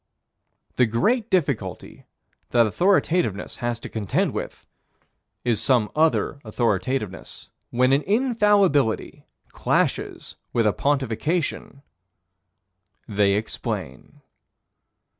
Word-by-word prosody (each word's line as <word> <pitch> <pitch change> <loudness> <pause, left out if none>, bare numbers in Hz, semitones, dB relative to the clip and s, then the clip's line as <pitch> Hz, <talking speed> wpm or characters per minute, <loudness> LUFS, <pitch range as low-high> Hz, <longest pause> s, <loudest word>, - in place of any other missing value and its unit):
The 125 - +4
great 215 - +1
difficulty 140 - -2 0.4
that 120 -1 +4
authoritativeness 170 - +1
has 120 -1 -2
to - - -6
contend 105 -4 -1
with - - -6 0.8
is 120 -3 +1
some 120 -5 +2
other 155 -2 +1
authoritativeness. 110 -1 -2 0.2
When 130 +2 +2
an 140 - +3
infallibility 205 - +2 0.2
clashes - - -1 0.2
with 115 -2 +2
a 105 - +3
pontification 140 +2 -1 1.2
They 100 -1 +2
explain. 110 +2 -5
130 Hz, 85 wpm, -23 LUFS, 110-170 Hz, 1.2 s, The